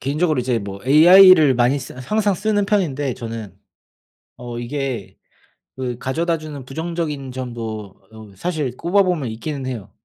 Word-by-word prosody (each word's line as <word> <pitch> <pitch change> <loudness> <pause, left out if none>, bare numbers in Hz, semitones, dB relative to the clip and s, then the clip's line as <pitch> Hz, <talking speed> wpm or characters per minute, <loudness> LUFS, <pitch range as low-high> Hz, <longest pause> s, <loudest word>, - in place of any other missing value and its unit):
개인적으로 150 +1 0
이제 125 -1 0
뭐 100 -2 -7
AI를 160 0 +7
많이 125 +4 +2
쓰 130 - -9
항상 205 +10 0
쓰는 205 +2 0
편인데 145 - 0
저는 115 -5 -7 0.8
어 120 -1 -7
이게 130 -3 -4 0.6
그 125 -2 -4
가져다주는 155 -1 -3
부정적인 150 -2 -4
점도 115 -6 -6
어 110 -3 -13
사실 150 - -3
꼽아보면 175 - +1
있기는 135 +5 -5
해요. 115 -5 -6
135 Hz, 300 characters per minute, -20 LUFS, 120-165 Hz, 0.8 s, AI를